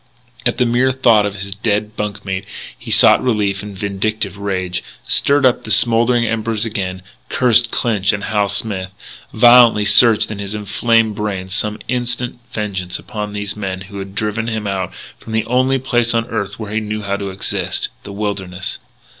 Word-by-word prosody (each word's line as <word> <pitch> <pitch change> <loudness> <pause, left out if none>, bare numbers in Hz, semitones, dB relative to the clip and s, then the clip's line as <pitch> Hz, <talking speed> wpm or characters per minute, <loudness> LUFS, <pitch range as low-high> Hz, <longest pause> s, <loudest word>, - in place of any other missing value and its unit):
At 120 - -1
the 125 - +2
mere 125 +2 +2
thought 115 -5 +4
of 100 - -6
his 100 0 -4
dead 105 0 -1
bunk 105 -1 -4
mate 95 0 -3 0.3
he - - -11
sought - - +5
relief 105 -5 0
in 105 -1 -8
vindictive 100 +1 -2
rage 95 -3 -3 0.2
stirred 140 0 +3
up 125 - +3
the - - -8
smouldering 120 +2 +4
embers 115 -1 -1
again, 95 -4 -4 0.3
cursed 120 -2 +4
Clinch 105 -6 +1
and 105 -1 -4
Hal 105 -1 0
Smith, 100 -2 -2 0.4
violently 120 -2 +6
searching 110 +1 +5
in 105 - -6
his 100 +1 -4
inflamed 110 +1 +1
brain 100 -3 -4
some 105 +2 -1
instant 125 -1 -2
vengeance 95 -5 -3
upon 105 -2 -6
these 105 0 -3
men 95 -3 -4
who 100 +1 -9
had 95 0 -8
driven 110 +2 -2
him 110 -2 -3
out 95 -2 -2 0.3
from 110 - -9
the 110 0 0
only 130 +2 +2
place 120 -3 0
on 115 0 +1
earth 100 -3 -3
where 105 -2 -6
he 110 - +1
knew 105 0 -4
how 100 0 -1
to 100 -1 -4
exist 95 +1 -2
the 100 - -10
wilderness. 100 -3 -4
105 Hz, 180 wpm, -17 LUFS, 100-115 Hz, 0.4 s, violently